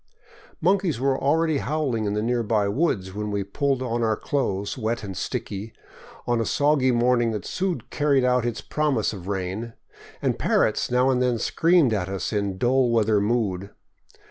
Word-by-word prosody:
Monkeys 180 - +2
were 135 +1 +2
already 155 +2 +1
howling 140 -8 -1
in 100 0 -1
the 105 - -1
nearby 115 -3 +1
woods 100 - 0
when 105 +1 -4
we 100 -1 -1
pulled 135 +6 -1
on 120 -1 -2
our 110 -1 +2
clothes, 100 -8 -2
wet 115 -1 -2
and 95 -2 -6
sticky, 105 +5 -4 0.5
in 120 -1 +1
a - - +1
soggy 145 +2 +2
morning 120 -1 +2
that 105 -3 -4
soon 180 -8 -2
carried 140 -3 +2
out 125 -1 +2
its 120 -2 -3
promise 145 -9 0
of 95 -3 -9
rain; 100 +4 -3 0.5
and - - -1
parrots - - +1
now 125 +2 +3
and 125 -1 +1
then 125 -2 +1
screamed 165 0 +3
at 95 -3 -1
us 95 +3 -3
in 100 -2 -1
dull 125 +4 +2
weather 110 -3 +2
mood. 100 -4 -1
120 Hz, 170 wpm, -24 LUFS, 105-135 Hz, 0.5 s, now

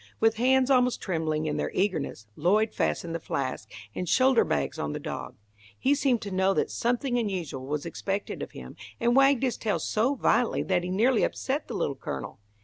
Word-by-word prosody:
With 225 0 +3
hands 260 +2 +3
almost 250 -1 +3
trembling 160 -4 -1
in 150 -1 -1
their - - -1
eagerness, 180 - -1
Lloyd 210 +7 +2
fastened 170 -1 -1
the 165 - -2
flask 130 -7 -3 0.2
and 180 +7 -4
shoulder 260 -2 +5
bags 70 -2 -1
on 75 0 -2
the - - -4
dog. - - -6 0.4
He 275 - +2
seemed 270 -5 +1
to 200 - -5
know 190 +1 +2
that - - 0
something 245 +1 0
unusual 175 - -3
was 150 +2 -2
expected 195 +4 -3
of - - -5
him, - - -9 0.2
and 240 -1 +2
wagged 275 -1 +5
his 255 -2 0
tail 215 -2 0
so 240 +6 0
violently 245 -2 +2
that 185 -2 +1
he 180 - -3
nearly 225 +6 +3
upset 280 +3 -1
the - - -5
Little - - 0
Colonel. 100 - -6
205 Hz, 195 wpm, -27 LUFS, 160-250 Hz, 0.4 s, shoulder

